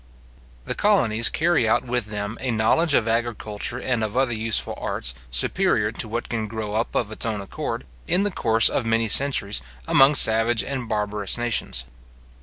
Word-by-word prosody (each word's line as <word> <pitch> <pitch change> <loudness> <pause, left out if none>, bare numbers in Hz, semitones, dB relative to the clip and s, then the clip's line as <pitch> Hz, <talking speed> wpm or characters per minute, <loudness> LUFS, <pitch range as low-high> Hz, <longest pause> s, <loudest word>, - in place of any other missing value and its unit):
The - - -2
colonies 120 - +2
carry 160 -8 +1
out - - +1
with 120 -3 -2
them 105 +1 -4
a 130 - -3
knowledge 130 +8 +2
of 115 - +1
agriculture 115 0 -3
and 125 -2 -2
of 110 +3 -4
other 130 -2 +1
useful 110 0 0
arts, - - -2 0.2
superior 105 - 0
to 115 - -4
what 115 +2 -5
can 110 -2 -3
grow 105 -1 -6
up 110 +2 -3
of 110 -3 -1
its 110 - -2
own 110 -2 -1
accord, 95 -8 -6 0.2
in 180 +3 +2
the 205 - +1
course 115 -8 +3
of - - -1
many 115 0 0
centuries, 110 - +2 0.3
among 135 +2 +5
savage 115 -1 +5
and 130 -4 -5
barbarous 105 -2 -2
nations. 120 -1 -1
115 Hz, 175 wpm, -22 LUFS, 110-125 Hz, 0.3 s, among